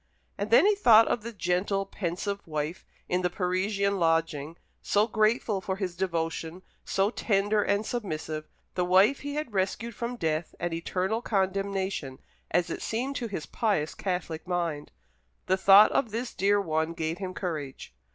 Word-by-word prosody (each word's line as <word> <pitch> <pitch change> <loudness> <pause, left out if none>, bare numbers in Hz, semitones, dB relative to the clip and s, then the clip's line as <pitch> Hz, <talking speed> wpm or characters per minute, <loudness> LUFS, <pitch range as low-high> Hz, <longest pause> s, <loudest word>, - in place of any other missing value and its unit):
And - - -3
then 470 -3 +6
he 420 - +5
thought 230 - +6
of 235 - 0
the 235 +2 -6
gentle 195 0 0
pensive 195 +1 -4
wife 155 +2 -3 0.2
in 180 +1 0
the 180 - +1
Parisian 195 +2 0
lodging, 165 -2 0 0.2
so 205 +1 +2
grateful 215 -2 +1
for 190 0 -2
his 190 -3 -4
devotion, 170 -1 -3 0.2
so 195 +2 +1
tender 205 -2 +1
and 205 +1 0
submissive, 155 -9 -4 0.3
the 180 - 0
wife 190 +9 +4
he 285 0 -5
had 300 -7 -4
rescued 205 +5 -1
from 235 +4 -4
death 160 -5 -2
and 175 -1 -2
eternal 185 +6 -1
condemnation, 195 - -1 0.3
as 175 0 +1
it - - -4
seemed 255 +5 -2
to 240 - -3
his 195 -7 -5
pious 195 -9 0
Catholic 180 -3 -4
mind. 170 -5 -2 0.5
The 190 - +3
thought 195 +2 +7
of 245 - +1
this 235 +3 -4
dear 205 +1 +2
one 160 -3 -1
gave 160 +1 -3
him 185 -2 -5
courage. 150 -7 -5
190 Hz, 160 wpm, -28 LUFS, 170-210 Hz, 0.5 s, thought